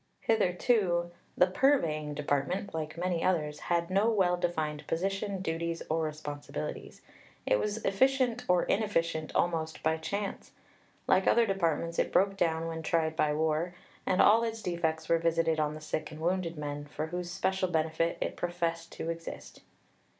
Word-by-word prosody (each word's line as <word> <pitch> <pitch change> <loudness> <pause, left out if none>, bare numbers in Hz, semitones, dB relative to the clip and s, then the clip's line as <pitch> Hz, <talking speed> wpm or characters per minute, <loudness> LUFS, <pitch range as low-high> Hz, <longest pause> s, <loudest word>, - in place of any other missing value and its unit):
Hitherto 180 -4 +2 0.3
"the - - +7
Purveying 165 - +1
Department, 150 +7 -1
like 155 0 -4
many 175 -1 -1
others, 150 -5 0
had 170 0 -1
no 200 +4 +3
well 190 -5 +3
defined 155 -4 -2
position, 195 +3 -2
duties, 165 0 -2
or 165 +1 +1
responsibilities. 150 -2 -5 0.4
It 105 - +3
was 210 +1 -2
efficient 250 +3 +2
or 180 -1 +4
inefficient 165 -7 0
almost 160 -2 0
by 160 0 +2
chance. 200 +5 -4 0.5
Like 190 0 +3
other 235 0 +5
departments, 170 -4 0
it - - +1
broke 195 +1 +3
down 165 -3 0
when 165 -1 -4
tried 160 0 0
by 150 -2 +2
war; 160 +3 0 0.3
and 185 - +3
all 225 +3 +6
its 225 -1 -3
defects 160 -3 -1
were 165 - +3
visited 165 -1 +1
on 150 0 0
the 155 - -9
sick 155 0 -3
and 155 0 -10
wounded 170 0 -1
men, 145 -1 -4
for 150 +1 -4
whose 175 +2 -4
special 190 +1 0
benefit 160 0 0
it - - -2
professed 165 -1 -2
to 165 - -3
exist." 75 - -8
170 Hz, 155 wpm, -30 LUFS, 160-190 Hz, 0.5 s, the